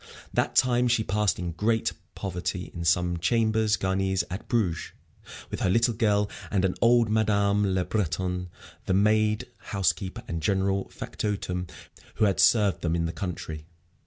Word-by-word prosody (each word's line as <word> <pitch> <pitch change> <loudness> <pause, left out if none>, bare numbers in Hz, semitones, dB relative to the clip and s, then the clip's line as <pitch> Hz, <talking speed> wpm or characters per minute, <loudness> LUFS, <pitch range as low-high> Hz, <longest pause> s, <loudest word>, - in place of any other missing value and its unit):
That - - 0
time 125 -1 +3
she 115 -2 +2
passed 105 0 +1
in 90 0 -3
great 110 +6 0 0.2
poverty 90 -1 -4
in 85 -1 -5
some 90 +1 +2
chambres 110 +3 +2
garnies 95 0 0
at 95 - -6
Bruges, 90 -9 -1 0.6
with - - -4
her - - +1
little 115 +4 +3
girl 105 -2 +2 0.2
and 95 -2 +1
an 90 - +1
old 120 -1 +5
Madame 100 -2 +2
Le 90 -1 0
Breton, 90 -2 -2 0.4
the 95 - +2
maid, 105 +1 +2
housekeeper, 95 -2 -2
and 85 -1 -3
general 95 +3 0
factotum 90 -4 -3 0.5
who 110 - +3
had 100 - +1
served 105 -4 +4
them 85 0 0
in 85 -1 0
the 80 - -3
country. 80 -3 -5
95 Hz, 155 wpm, -27 LUFS, 90-110 Hz, 0.6 s, old